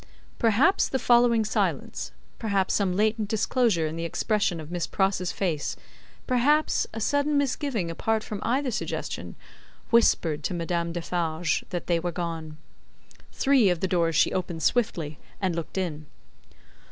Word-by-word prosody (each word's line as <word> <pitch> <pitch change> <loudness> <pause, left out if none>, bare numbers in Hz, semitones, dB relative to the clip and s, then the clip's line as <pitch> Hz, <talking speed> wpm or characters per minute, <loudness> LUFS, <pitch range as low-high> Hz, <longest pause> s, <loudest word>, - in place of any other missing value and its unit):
Perhaps 240 - +3
the 265 - 0
following 240 -3 +4
silence, 215 - -1 0.3
perhaps 200 -4 0
some 190 -3 +1
latent 215 +1 +1
disclosure 220 -5 +2
in 155 +1 -3
the 165 - -3
expression 190 +1 0
of 155 +1 -9
Miss 175 -1 -2
Pross's 190 -2 0
face, 165 -7 -2 0.5
perhaps 285 +5 +2
a 225 - -6
sudden 285 +5 +1
misgiving 270 - -1
apart 220 +6 -1
from 210 - -5
either 260 +3 0
suggestion, 225 - -4 0.6
whispered 165 -9 +3
to 180 - -1
Madame 170 0 -1
Defarge 165 -1 -1
that 175 - -4
they 170 -1 +1
were 175 +1 -2
gone. 165 -3 -5 0.7
Three 265 - +4
of 175 -2 0
the 190 - 0
doors 170 -3 +1
she - - +3
opened 175 -3 -3
swiftly, 165 -11 0 0.2
and 185 -4 0
looked 170 +3 -5
in. 155 -5 -3
190 Hz, 145 wpm, -26 LUFS, 170-230 Hz, 0.7 s, following